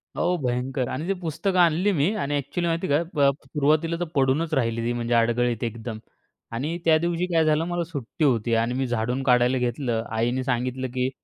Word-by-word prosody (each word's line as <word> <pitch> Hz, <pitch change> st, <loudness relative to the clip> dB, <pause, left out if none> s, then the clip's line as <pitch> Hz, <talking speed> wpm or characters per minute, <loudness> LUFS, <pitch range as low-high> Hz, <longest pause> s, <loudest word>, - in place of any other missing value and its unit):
अहो, 180 Hz, +1 st, +1 dB
भयंकर 125 Hz, +1 st, -1 dB
आणि 155 Hz, +7 st, -4 dB
ते 195 Hz, -, +2 dB
पुस्तकं 180 Hz, +3 st, -1 dB
आणली 175 Hz, +4 st, +4 dB
मी 165 Hz, +7 st, +2 dB
आणि, 145 Hz, -7 st, -2 dB
एक्चुअली 170 Hz, +5 st, -2 dB
माहिती 165 Hz, +3 st, -1 dB
का? 145 Hz, +3 st, +2 dB, 0.4 s
सुरुवातीला 155 Hz, +4 st, +1 dB
तर 175 Hz, -, 0 dB
पडूनच 140 Hz, +4 st, +1 dB
राहिली 115 Hz, -4 st, 0 dB
ती, 120 Hz, -, 0 dB
म्हणजे 120 Hz, 0 st, -2 dB
अडगळीत 120 Hz, 0 st, +1 dB
एकदम 115 Hz, 0 st, -4 dB, 0.6 s
आणि 150 Hz, +8 st, -2 dB
त्या 160 Hz, -1 st, +6 dB
दिवशी 170 Hz, +2 st, -1 dB
काय 165 Hz, -1 st, +4 dB
झालं, 155 Hz, +1 st, +2 dB
मला 175 Hz, -1 st, -1 dB
सुट्टी 155 Hz, -3 st, -5 dB
होती 115 Hz, -3 st, +1 dB
आणि 115 Hz, +2 st, +1 dB
मी 130 Hz, 0 st, -1 dB
झाडून 120 Hz, +3 st, -1 dB
काढायला 125 Hz, 0 st, +3 dB
घेतलं. 120 Hz, -2 st, -1 dB
आईने 120 Hz, +3 st, 0 dB
सांगितलं, 130 Hz, 0 st, -1 dB
की 130 Hz, 0 st, 0 dB
130 Hz, 185 wpm, -24 LUFS, 120-165 Hz, 0.6 s, त्या